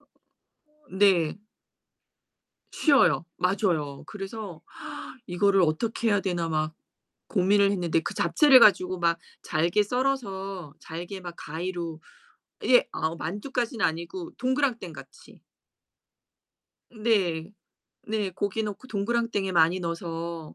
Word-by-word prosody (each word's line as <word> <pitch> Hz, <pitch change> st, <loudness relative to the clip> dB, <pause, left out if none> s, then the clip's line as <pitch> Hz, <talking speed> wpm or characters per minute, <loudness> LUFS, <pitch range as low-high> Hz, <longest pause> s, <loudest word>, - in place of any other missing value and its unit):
어 -, -, -31 dB, 0.8 s
네. 190 Hz, -4 st, +3 dB, 1.3 s
쉬어요. 280 Hz, -, +4 dB
맞아요. 180 Hz, -7 st, 0 dB
그래서 195 Hz, -3 st, -7 dB, 0.6 s
'이거를 195 Hz, +1 st, +3 dB
어떻게 225 Hz, +8 st, 0 dB
해야 205 Hz, -2 st, +3 dB
되나?' 175 Hz, -3 st, -1 dB
막 155 Hz, 0 st, -1 dB, 0.5 s
고민을 200 Hz, 0 st, +3 dB
했는데 175 Hz, -4 st, +1 dB
그 -, -, -4 dB
잡채를 255 Hz, -, +6 dB
가지고 185 Hz, -4 st, +5 dB
막 170 Hz, -1 st, +2 dB, 0.2 s
잘게 170 Hz, +6 st, +2 dB
썰어서 195 Hz, -, -2 dB
잘게 175 Hz, +4 st, -7 dB
막 175 Hz, -2 st, -8 dB
가위로 165 Hz, 0 st, -5 dB, 0.7 s
예 250 Hz, -1 st, +5 dB
어 160 Hz, +1 st, -1 dB
만두까지는 225 Hz, -, -2 dB
아니고 170 Hz, +2 st, -3 dB
동그랑땡 255 Hz, -, 0 dB
같이. 135 Hz, -2 st, -14 dB, 1.5 s
네. 200 Hz, -6 st, 0 dB, 0.6 s
네 210 Hz, -3 st, -1 dB
고기 200 Hz, +4 st, -2 dB
넣고 215 Hz, +4 st, -6 dB
동그랑땡에 215 Hz, -2 st, -1 dB
많이 170 Hz, +1 st, +4 dB
넣어서 170 Hz, -1 st, -5 dB
185 Hz, 230 characters per minute, -27 LUFS, 170-210 Hz, 1.5 s, 잡채를